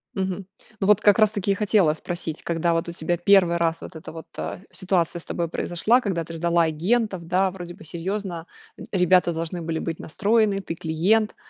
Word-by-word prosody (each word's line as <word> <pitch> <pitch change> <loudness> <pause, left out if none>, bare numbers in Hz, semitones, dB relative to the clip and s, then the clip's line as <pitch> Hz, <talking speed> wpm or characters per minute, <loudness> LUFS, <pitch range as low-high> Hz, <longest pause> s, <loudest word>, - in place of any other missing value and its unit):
Мгм. 190 0 -2 0.3
Ну, 195 - 0
вот 210 +1 +5
как 205 +1 +5
раз-таки 205 -2 +2
и - - +4
хотела 195 -7 +3
спросить, 165 0 -5
когда 170 0 0
вот 165 +1 -1
у 170 - -5
тебя 170 +1 -1
1 175 -1 +4
раз 165 -1 0
вот 165 - -9
это 155 - -9
вот, 160 - -9
а, - - -4
ситуация 180 -3 0
с - - -10
тобой 170 -2 -2
произошла, 210 +10 +2
когда 190 -8 -2
ты 165 - -9
ждала 170 +1 +2
агентов, 180 +3 0
да, 185 +1 +2
вроде 175 -2 -8
бы - - -14
серьезно, 175 +1 -4 0.3
э, - - -9
ребята 180 -1 +4
должны 165 +2 -4
были 160 0 -2
быть 165 -1 -4
настроены: 205 +2 +1
"Ты 165 - -5
клиент". 185 +8 +1
175 Hz, 200 wpm, -24 LUFS, 165-195 Hz, 0.3 s, вот